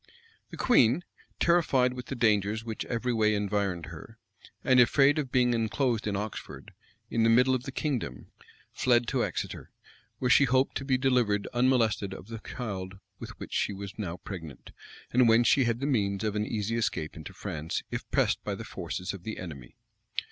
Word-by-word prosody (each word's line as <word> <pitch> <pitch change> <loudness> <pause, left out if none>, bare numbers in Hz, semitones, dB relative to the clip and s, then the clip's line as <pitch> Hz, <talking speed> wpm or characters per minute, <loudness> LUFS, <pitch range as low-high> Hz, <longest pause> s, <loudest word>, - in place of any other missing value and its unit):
The - - -9
queen, 145 - +4 0.4
terrified 140 -7 +3
with 125 -1 -8
the 135 - -4
dangers 110 -1 +1
which 110 -2 -4
every 120 +1 -1
way 110 -1 +3
environed 100 -4 -1
her, 85 +8 -11 0.5
and 130 -1 +5
afraid 140 +4 +5
of 135 -4 -3
being 125 -1 +3
enclosed 115 0 0
in 100 - -1
Oxford, 105 +1 -6 0.4
in 115 - +1
the 115 - +4
middle 125 +3 +5
of 125 -1 -1
the 135 - -5
kingdom, 130 - -3 0.4
fled 120 -1 +2
to 130 -3 +1
Exeter, - - -4 0.5
where 125 - -1
she 140 - +7
hoped 130 +1 +2
to 135 - -6
be 130 -1 +2
delivered 125 -6 +1
unmolested 115 -6 +2
of 100 - -12
the 115 -1 -6
child 95 -6 -5 0.2
with - - -9
which - - -8
she 105 - 0
was 100 +1 -8
now 90 -4 -3
pregnant, 80 -4 -9 0.4
and 125 -1 +5
whence 115 +1 +5
she 135 -3 +4
had 115 0 0
the - - 0
means 100 -7 0
of 105 -1 -1
an 105 0 -1
easy 110 +1 -2
escape 80 -8 -2
into 80 -2 -8
France, 80 +1 -4
if - - -5
pressed - - +1
by - - -3
the - - -7
forces 90 +3 -5
of 100 - -8
the 110 +4 -6
enemy. 70 -9 -9
115 Hz, 185 wpm, -28 LUFS, 100-125 Hz, 0.5 s, she